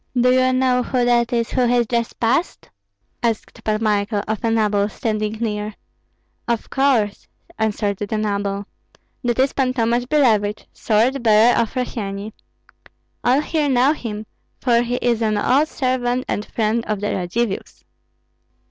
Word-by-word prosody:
'" - - -46
"Do 250 +1 +4
you 255 0 +3
know 255 -1 +2
who 245 0 0
that 240 0 +2
is 235 -1 0
who 255 - +1
has 240 0 +3
just 235 0 -2
passed?" 255 +9 0 0.5
asked 230 -3 -3
Pan 215 0 -1
Michael 205 -1 0
of 215 -1 -3
a 230 - +2
noble 210 -2 +1
standing 215 0 -2
near. 215 -2 -3 0.7
"Of 235 -2 -2
course," 255 -7 +1 0.3
answered 210 -2 0
the 205 +2 -3
noble; 200 -1 -2 0.6
"that 240 -1 0
is 265 +1 +2
Pan 255 -2 0
Tomash 240 +1 +1
Billevich, 220 -8 +2
sword 240 +5 +1
bearer 225 +1 +5
of 230 +2 0
Rossyeni. 210 -4 -4 0.9
All 255 +4 +3
here 305 -2 0
know 260 +3 +4
him, 220 -7 -6 0.3
for 235 -2 +3
he 240 +1 -2
is 235 -2 +1
an 215 -2 +1
old 275 +8 +3
servant 255 -3 -1
and 210 - -2
friend 225 +1 0
of 215 -2 -1
the 205 - -2
Radzivills." 195 +4 -3
230 Hz, 155 wpm, -20 LUFS, 210-250 Hz, 0.9 s, bearer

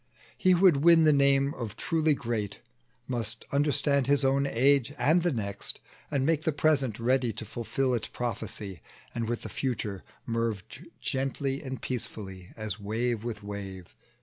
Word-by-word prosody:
He 185 -1 +4
who 175 - +2
would 180 -7 +7
win 165 +2 +6
the 155 -1 +6
name 140 0 +3
of 115 -4 -5
truly 160 -3 +2
great 115 -6 -3 0.5
Must 115 -3 -3
understand 140 -1 +2
his 140 -1 +3
own 135 +1 +3
age 140 +2 +3
and 165 +4 +4
the 175 0 +1
next, 100 -6 -3 0.3
And 140 -3 0
make 160 -1 +2
the 160 - +1
present 140 -6 +2
ready 125 0 +2
to 110 - -6
fulfil 125 +4 -1
Its 120 - -1
prophecy, 105 - -4 0.3
and 115 -1 -2
with 120 - -2
the - - -5
future 110 -7 -3 0.2
merge 115 -4 -3 0.2
Gently 135 +1 -1
and 130 -2 -5
peacefully, 95 -7 -5
as 110 -1 -4
wave 110 +2 -1
with 115 -4 -5
wave. 95 -7 -7
125 Hz, 160 wpm, -29 LUFS, 110-140 Hz, 0.5 s, would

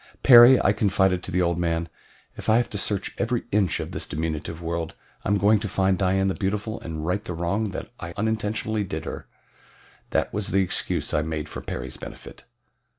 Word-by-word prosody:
"Perry," 120 0 +9
I - - +3
confided 95 -3 +2
to 90 - -6
the 90 0 +2
old 85 0 0
man, 85 -1 0 0.5
"if - - -5
I 110 - +6
have 120 - 0
to 105 - -3
search 100 -1 -1
every 120 0 0
inch 100 -3 +2
of - - -5
this - - -4
diminutive 80 +1 -4
world 85 -1 -3 0.3
I - - -2
am 105 - +3
going 105 +2 +4
to 105 - -4
find 95 0 +1
Dian 95 0 +2
the 95 - +1
Beautiful 105 +3 -3
and 80 -2 -5
right 90 +4 -1
the 90 - -5
wrong 100 +5 -1 0.3
I 85 - -6
unintentionally 110 0 -1
did 80 -4 -5
her." - - -6 0.8
That - - 0
was 105 -1 -1
the 95 +1 +2
excuse 90 - -2
I 75 - +2
made 80 -1 -3
for - - -7
Perry's 65 0 -5
benefit. - - -11
95 Hz, 200 wpm, -25 LUFS, 85-105 Hz, 0.8 s, Perry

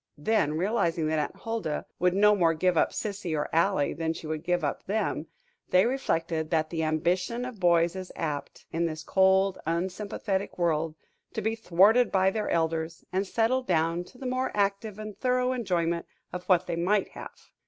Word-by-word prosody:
Then, 155 -2 +1
realizing 175 -4 +1
that 155 0 +1
Aunt 150 - -2
Huldah 225 -10 -3
would 180 +1 +2
no 210 +1 +5
more 165 -4 +3
give 180 +2 +2
up - - +3
Sissy 200 -7 -3
or 150 - -1
Ally 165 -2 +2
than 160 0 -2
she 165 - -9
would 155 0 -4
give 175 -1 0
up 145 - -1
them, 195 -6 -1 0.4
they 185 +1 +5
reflected 165 -11 -1
that 160 -1 0
the 165 -2 -1
ambition 180 +9 0
of 250 -5 -8
boys 170 -1 +3
is 185 -1 -6
apt, 150 -3 -4
in 170 +1 +1
this 155 -1 -5
cold, 190 0 +3
unsympathetic 190 +3 -2
world, 165 -2 0 0.4
to 220 - -2
be 220 +1 +1
thwarted 220 +4 +4
by 190 0 +3
their 215 +1 -2
elders, 160 0 -1
and 190 +2 0
settled 245 +5 +1
down 165 0 +1
to 250 - -17
the 265 - -9
more 255 +1 0
active 200 +1 0
and 215 -1 -8
thorough 250 0 +1
enjoyment 170 -8 -1 0.3
of 180 0 -5
what 185 -1 +3
they 175 - -2
might 190 +4 +1
have. - - -12
180 Hz, 185 wpm, -28 LUFS, 165-210 Hz, 0.4 s, no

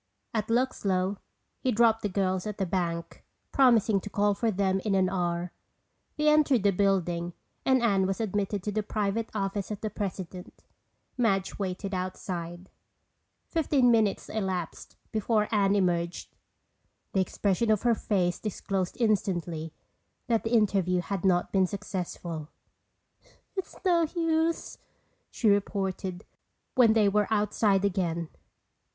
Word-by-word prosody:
At 215 -2 -1
Luxlow 200 -6 0 0.4
he 260 - 0
dropped 225 0 +4
the 205 - -1
girls 190 0 0
at 210 - -5
the 195 - 0
bank, 170 -2 -3 0.3
promising 230 -6 +4
to 205 - -7
call 205 0 +2
for 225 +3 0
them 190 -2 +1
in 200 0 0
an 185 -1 +3
hour. 175 -1 -1 0.7
They 300 0 +1
entered 295 -7 +4
the 200 - +4
building 175 -3 0 0.3
and 260 -2 +4
Anne 195 -4 +3
was 195 +2 -2
admitted 205 -2 -1
to 210 - -2
the 215 +1 0
private 210 +1 -2
office 195 -1 -2
of 210 -2 -4
the 215 - -3
president. 185 -3 -6 0.6
Madge 195 -5 +1
waited 195 0 -3
outside. 180 -1 -5 0.7
Fifteen 280 -6 +2
minutes 220 -4 +2
elapsed 190 -5 -4 0.2
before 215 -1 +1
Anne 200 -2 +3
emerged. 175 -3 -1 0.8
The 190 - +3
expression 200 +4 0
of 215 -2 +2
her 240 -1 +4
face 180 -5 0
disclosed 195 -3 -3
instantly 175 -7 0 0.5
that 230 -2 +1
the 225 - -2
interview 190 -5 +2
had 195 0 -4
not 180 -2 +2
been 190 -2 +3
successful. 175 -5 -5 1.1
"It's 380 - -5
no 340 -3 +4
use," 330 0 0 0.5
she 230 - -1
reported 195 -2 0 0.5
when 245 -4 +5
they 215 -2 +4
were 210 +1 +2
outside 210 -2 +2
again. 170 -4 -1
200 Hz, 135 wpm, -28 LUFS, 185-220 Hz, 1.1 s, when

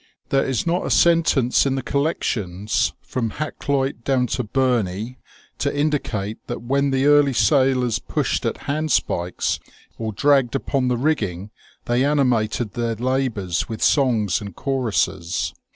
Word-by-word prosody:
There 135 - +2
is 130 -4 -1
not 175 +2 0
a - - -3
sen 170 -1 +5
tence 135 -4 +2
in 135 - 0
the 135 - -3
collections 110 - -1
from 115 -4 -3
Hakluyt 140 -4 -2
down 130 -1 +2
to 125 - -1
Burney 120 -2 -1 0.4
to 145 0 -1
indicate 115 -9 -1
that - - -5
when 140 +3 +1
the 135 0 +1
early 145 -1 +5
sailors 130 -3 +2
pushed - - -1
at - - -3
hand 155 +2 -1
spikes 85 +1 0 0.4
or 110 -1 -2
dragged 135 +2 +2
upon 135 -1 0
the 125 -1 +1
rigging 105 - -1 0.3
they 120 +2 +1
animated 120 -6 +1
their 115 -1 -1
labours 115 -7 -1
with 110 -1 -4
songs 115 - +2
and 100 -3 -8
choruses. 105 -10 -1
125 Hz, 145 wpm, -22 LUFS, 110-140 Hz, 0.4 s, sen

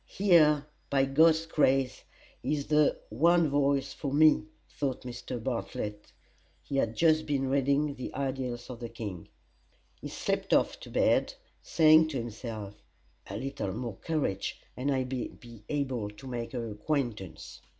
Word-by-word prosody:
"Here, 155 -7 +4 0.2
by 135 -1 +3
God's 160 +4 +4
grace, 135 -5 +1 0.4
is 145 -2 -1
the 150 -1 +3
one 165 +6 +3
voice 140 -1 +1
for 140 - -4
me," 155 - +5 0.2
thought 135 -3 -3
Mr. 125 0 -6
Bartlett. 115 -3 -4 0.5
[He 140 - -3
had 115 -4 0
just 155 -1 +3
been 135 -2 0
reading 140 +2 +2
the 130 - -6
"Idyls 130 -3 -3
of 120 - -8
the 120 -1 -6
King."] 105 -7 -7 0.7
He - - -6
slipped - - 0
off - - +1
to - - -10
bed, - - +2 0.3
saying 155 0 +5
to 150 -4 -3
himself: 110 -3 -6 0.5
"A 100 - -4
little 130 -6 -3
more 115 -2 -5
courage, 140 - -2 0.2
and 130 +3 -2
I 130 -1 +1
may 125 -1 -3
be 115 -3 -14
able 130 -7 -1
to 105 +5 -13
make 120 -2 -5
her 115 -3 -3
acquaintance." 110 - -3
135 Hz, 150 wpm, -29 LUFS, 115-150 Hz, 0.7 s, me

